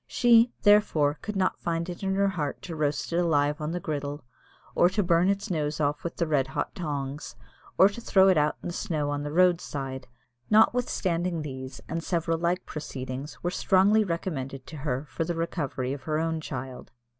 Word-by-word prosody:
She, 240 -1 +5
therefore, 160 -9 +4
could 210 -1 -5
not 185 -1 0
find 170 0 -2
it 175 -1 -7
in 190 -1 0
her 200 0 +3
heart 155 -7 -4
to 170 - -6
roast 145 -1 -1
it - - +1
alive 150 -3 +1
on 150 - -2
the 175 - -2
griddle, 145 -2 -4 0.5
or 175 - +4
to 205 +2 0
burn 175 +1 +3
its 200 -1 -1
nose 150 -2 -1
off 145 -1 0
with 170 - -4
the 170 - 0
red 145 -4 +1
hot 135 - -3
tongs, 145 -4 -4 0.4
or 190 - +8
to 210 +4 -6
throw 190 -4 +4
it 190 - +5
out 150 -1 +2
in - - -4
the - - -5
snow 150 -4 -2
on 145 0 -2
the 145 0 -4
road 180 +1 +4
side, 135 -2 -5 0.4
notwithstanding 180 -7 +2
these, 130 -2 -7
and 165 0 -3
several 165 -2 -1
like 175 +2 0
proceedings, 135 -1 -6
were 175 - 0
strongly 200 +3 +4
recommended 140 -8 -4
to 155 - -9
her 135 -1 -2
for 165 - -3
the 170 +1 -3
recovery 145 -6 -2
of 140 - -7
her 160 +1 -1
child. 130 -4 -7
160 Hz, 195 wpm, -27 LUFS, 145-180 Hz, 0.5 s, or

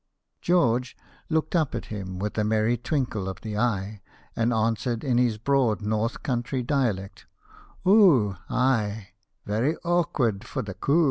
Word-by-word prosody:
George 125 -8 +1 0.3
looked 160 +1 0
up 155 -5 +1
at - - -4
him 95 -3 -5
with 105 +2 -3
a 105 - +1
merry 110 +2 +2
twinkle 120 -6 -2
of 95 0 -8
the 110 -2 -5
eye, 105 -3 -1 0.3
and 115 +1 +1
answered 115 +1 0
in 125 -3 +2
his 120 -3 +2
broad 125 -2 +1
North 110 +2 -1
Country 125 0 -2
dialect, 120 -8 -2 0.3
" - - -14
Oo, 165 - +5
ay, 110 -6 0 0.4
very 115 +10 0
awkward 145 - +1
for - - -4
the 100 -3 -6
coo!' 140 - +1
115 Hz, 150 wpm, -26 LUFS, 105-135 Hz, 0.4 s, Oo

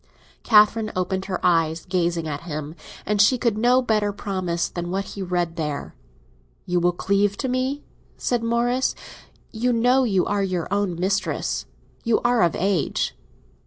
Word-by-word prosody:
Catherine 215 0 +4
opened 190 +1 -1
her 185 -2 -3
eyes, 165 -2 +2
gazing 175 -3 0
at 145 -1 -4
him, 155 -2 -5 0.3
and 210 -1 +2
she 250 +5 +5
could 235 -2 +1
give 215 - -4
no 250 +2 +4
better 215 -3 +1
promise 185 -4 -2
than 175 0 -5
what 195 +2 -2
he 200 - -6
read 175 -2 -2
there. 150 -3 -3 0.7
"You 180 0 +1
will 175 +1 +3
cleave 200 +3 +1
to 265 - -2
me?" 260 +3 -1 0.3
said 245 -2 0
Morris. 240 +2 +1 0.6
"You 240 +3 0
know 245 +3 +3
you 195 -7 +2
are 205 0 0
your 185 -3 -1
own 200 -4 -1
mistress—you 200 +3 -2
are 240 -1 +2
of 170 -2 +3
age." 190 -3 0
195 Hz, 160 wpm, -23 LUFS, 175-230 Hz, 0.7 s, she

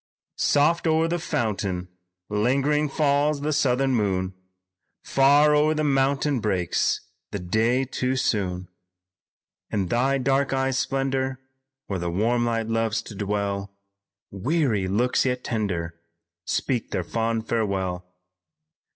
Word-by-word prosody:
"Soft, 160 +4 +3
o'er 160 +1 +3
the 175 +1 -1
fountain, 100 - -2 0.4
lingering 140 +8 +1
falls 145 0 +1
the 150 +1 0
southern 135 -1 +2
moon, 95 -4 0 0.7
Far 145 +2 +4
o'er 155 +1 +3
the 155 - 0
mountain 135 0 +1
breaks 95 -6 0 0.3
the - - -4
day 110 +8 +1
too 130 0 -1
soon. 90 -7 -1 1.0
In 95 -4 -1
thy 135 +5 +2
dark 135 +1 +1
eyes' 135 -1 +1
splendor, 135 -1 -1 0.5
where 95 -2 -3
the 85 0 -2
warm 115 +7 +1
light 115 -1 0
loves 115 -1 0
to - - -9
dwell, 100 -1 -2 0.6
Weary 115 - 0
looks 120 +7 +2
yet 125 -1 -1
tender, 85 -7 -3 0.4
speak 125 -4 -1
their 90 - -2
fond 115 +3 -2
farewell. 95 -5 -1
120 Hz, 120 wpm, -25 LUFS, 100-135 Hz, 1.0 s, Far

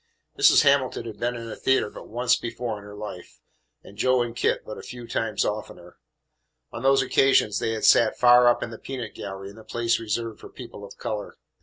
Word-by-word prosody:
Mrs. - - +6
Hamilton 140 -4 +2
had 110 -2 -8
been 120 +1 -1
in 115 -1 -7
a 115 - -6
theatre 135 -5 +1
but - - -11
once 125 +2 +2
before 115 -2 -5
in - - -14
her 105 0 -11
life, 105 -4 -9 0.4
and 100 +1 -15
Joe 130 +1 +3
and 120 -1 -6
Kit - - 0
but 110 - -8
a - - -8
few 120 -1 -9
times 110 -2 -1
oftener. 90 -4 -6 0.7
On 115 - -7
those 135 +1 +4
occasions 135 -6 +3
they 115 - -1
had 110 - -2
sat 115 - +5
far 125 0 +6
up 120 - +3
in 115 - -6
the 115 - -9
peanut 125 -5 -6
gallery 95 0 -7
in - - -16
the 110 - -12
place 115 0 0
reserved 115 0 -3
for - - -11
people 100 - -11
of 100 - -11
colour. 105 -1 -5
115 Hz, 215 wpm, -25 LUFS, 105-125 Hz, 0.7 s, Mrs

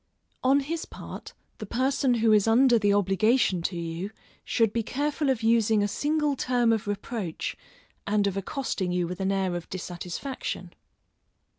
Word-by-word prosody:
On 270 +2 +4
his 320 +4 -3
part, - - -9 0.2
the 215 - -5
person 260 +2 +1
who 225 -1 +3
is 210 0 +4
under 240 +1 +5
the 205 -1 +3
obligation 200 0 +2
to 175 +1 -2
you, 170 +3 -4 0.3
should 225 -3 +1
be 230 - +1
careful 290 +5 -1
of 245 -4 0
using 225 -2 +3
a - - +2
single 295 +5 0
term 245 -3 +2
of 220 -2 -2
reproach 205 -3 -3 0.5
and 205 0 +2
of 200 -1 0
accosting 195 -3 -2
you 180 -1 +1
with 180 +2 -6
an 190 0 0
air 190 -2 0
of 175 0 -6
dissatisfaction. 180 +8 -5
220 Hz, 160 wpm, -27 LUFS, 195-255 Hz, 0.5 s, under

